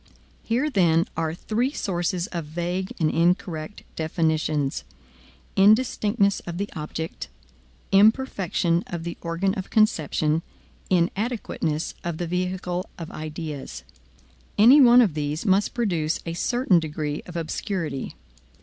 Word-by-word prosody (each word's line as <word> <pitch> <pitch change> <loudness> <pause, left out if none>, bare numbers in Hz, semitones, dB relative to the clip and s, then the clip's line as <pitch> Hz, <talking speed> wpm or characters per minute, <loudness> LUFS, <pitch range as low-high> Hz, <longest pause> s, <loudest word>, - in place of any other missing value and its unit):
Here, 245 +6 0
then, 170 - +3
are 160 0 -1
three 235 +8 -1
sources 175 - -1
of 170 -3 -4
vague 175 +4 -3
and 155 -2 +2
incorrect 175 +1 0
definitions: 155 -3 0 0.7
indistinctness 205 -1 +3
of 170 0 -4
the 200 +2 -3
object, 160 +1 -5 0.6
imperfection 195 -5 +3
of 170 -2 -5
the 170 0 -4
organ 170 +3 -1
of 190 -3 -5
conception, 160 -6 +2 0.5
inadequateness 180 -4 -1
of 170 -2 -3
the 175 - -2
vehicle 180 +1 -2
of 165 -2 -7
ideas. 155 -2 -6 0.7
Any 250 +8 +8
one 245 -1 +8
of 195 -9 0
these 150 +3 -3
must 195 0 +2
produce 175 -9 0
a 165 - -3
certain 240 0 +2
degree 150 -1 -3
of 175 - -10
obscurity. 165 -3 -3
175 Hz, 120 wpm, -24 LUFS, 160-200 Hz, 0.7 s, Any